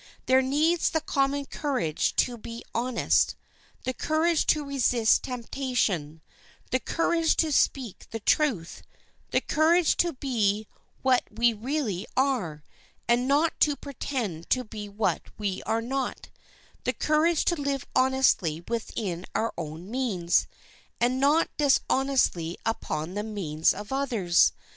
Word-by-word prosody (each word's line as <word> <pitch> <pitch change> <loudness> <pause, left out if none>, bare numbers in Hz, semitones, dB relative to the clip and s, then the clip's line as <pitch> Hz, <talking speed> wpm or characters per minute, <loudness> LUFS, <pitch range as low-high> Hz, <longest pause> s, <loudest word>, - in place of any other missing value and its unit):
There 260 0 +5
needs 305 +6 +2
the 320 - 0
common 280 -2 0
courage 260 - -1
to 245 - +2
be 230 +1 -8
honest, 240 +1 +1 0.5
the 255 - -2
courage 315 +4 +1
to 300 -1 +2
resist 250 -5 +2
temptation, 235 - -2 0.5
the 255 - +2
courage 330 +3 +1
to 320 -2 +1
speak 260 -6 0
the 225 - -5
truth, 220 - 0 0.5
the - - +1
courage 325 +2 +3
to 345 -1 +2
be 220 -6 0 0.4
what 260 -1 +3
we 235 0 +2
really 225 - -3
are, 225 - 0 0.4
and 240 +2 +2
not 295 +4 +2
to 295 -1 +3
pretend 245 - -5
to 255 - +2
be 210 -2 -8
what 205 +2 0 0.2
we 200 -3 -2
are 225 +1 0
not, 265 +1 -3 0.5
the - - 0
courage 310 +2 +2
to 345 - +2
live 280 -1 -2
honestly 255 -11 +2
within 215 -6 -3
our 225 - 0
own 165 +4 -7
means, 205 -10 +1 0.5
and 250 +2 +1
not 295 +4 +4
dishonestly 265 - +1
upon 165 -7 -2
the 205 - -2
means 180 -8 0
of 210 +5 -6
others. 230 -11 +3
250 Hz, 130 wpm, -27 LUFS, 205-280 Hz, 0.5 s, There